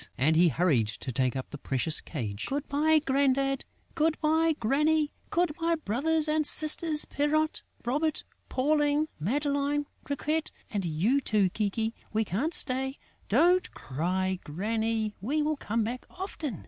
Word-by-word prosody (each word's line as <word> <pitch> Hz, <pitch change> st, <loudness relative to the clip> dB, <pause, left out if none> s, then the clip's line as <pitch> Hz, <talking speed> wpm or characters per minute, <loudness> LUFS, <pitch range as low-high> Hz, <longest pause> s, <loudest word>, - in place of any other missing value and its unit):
And 150 Hz, +5 st, +3 dB
he 175 Hz, +2 st, +6 dB
hurried 150 Hz, -8 st, +2 dB
to 115 Hz, +4 st, -5 dB
take 130 Hz, +1 st, 0 dB
up 130 Hz, -, -5 dB
the 145 Hz, -, -7 dB
precious 140 Hz, +5 st, +1 dB
cage. 110 Hz, -9 st, -5 dB
"Good 285 Hz, +2 st, -3 dB
bye, 310 Hz, +3 st, +3 dB
Grandad.... 275 Hz, 0 st, +1 dB, 0.3 s
Good 315 Hz, 0 st, +1 dB
bye, 320 Hz, +1 st, +2 dB
Granny.... 300 Hz, +5 st, +2 dB, 0.2 s
Good 345 Hz, -2 st, +1 dB
bye, 335 Hz, 0 st, +2 dB
brothers 310 Hz, +4 st, +1 dB
and 305 Hz, 0 st, +2 dB
sisters, 310 Hz, 0 st, +3 dB
Pierrot, 310 Hz, +2 st, 0 dB, 0.2 s
Robert, 295 Hz, +5 st, 0 dB, 0.3 s
Pauline, 295 Hz, +2 st, +1 dB
Madeleine, 285 Hz, -, 0 dB, 0.2 s
Riquette 305 Hz, +3 st, -1 dB, 0.2 s
and 205 Hz, -3 st, -1 dB
you, 190 Hz, -, +1 dB
too, 205 Hz, -5 st, +2 dB
Kiki.... 220 Hz, +2 st, -1 dB, 0.2 s
We 220 Hz, 0 st, +1 dB
can't 250 Hz, -, -1 dB
stay.... 265 Hz, 0 st, 0 dB, 0.3 s
Don't 360 Hz, +2 st, +3 dB
cry, 185 Hz, +7 st, -2 dB
Granny; 220 Hz, +6 st, -1 dB
we 295 Hz, +9 st, 0 dB
will 305 Hz, 0 st, 0 dB
come 225 Hz, -3 st, -1 dB
back 245 Hz, +3 st, -5 dB
often!" 325 Hz, -, -5 dB
270 Hz, 145 wpm, -28 LUFS, 195-305 Hz, 0.3 s, he